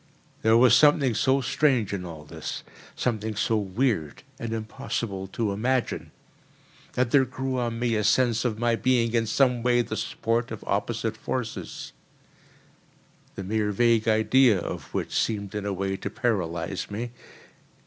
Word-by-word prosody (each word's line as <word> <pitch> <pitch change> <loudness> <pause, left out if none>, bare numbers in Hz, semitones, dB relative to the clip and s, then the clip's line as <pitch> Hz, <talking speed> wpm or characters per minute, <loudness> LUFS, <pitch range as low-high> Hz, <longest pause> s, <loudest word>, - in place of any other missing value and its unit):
There 110 +1 +5
was 120 -1 +7
something 140 -2 +5
so 130 +4 +2
strange 125 -5 +1
in 90 -2 -3
all 80 -3 -8
this, 75 - -6 0.3
something 110 -3 -2
so 110 +2 +1
weird 100 - -1 0.2
and 115 -1 -4
impossible 110 -3 -4
to 105 +2 -2
imagine, 120 +5 -1 0.8
that 125 -1 0
there 140 -2 +6
grew 130 0 -3
on 120 -1 -2
me 120 0 0
a 105 - 0
sense 115 +2 +3
of 115 -4 -1
my 120 0 +2
being 120 -1 +1
in 115 -1 +1
some 125 +1 +2
way 120 0 +3
the - - -5
sport 115 +1 -1
of 110 - -7
opposite 110 +2 -1
forces—the 115 - -5 1.5
mere 105 +2 0
vague 115 +1 +3
idea 110 +1 +4
of - - -6
which - - -3
seemed 100 -3 -1
in 105 -1 -3
a - - -1
way 95 0 -2
to - - -4
paralyse 95 -6 -2
me. 115 +4 -4
115 Hz, 150 wpm, -26 LUFS, 105-125 Hz, 1.5 s, was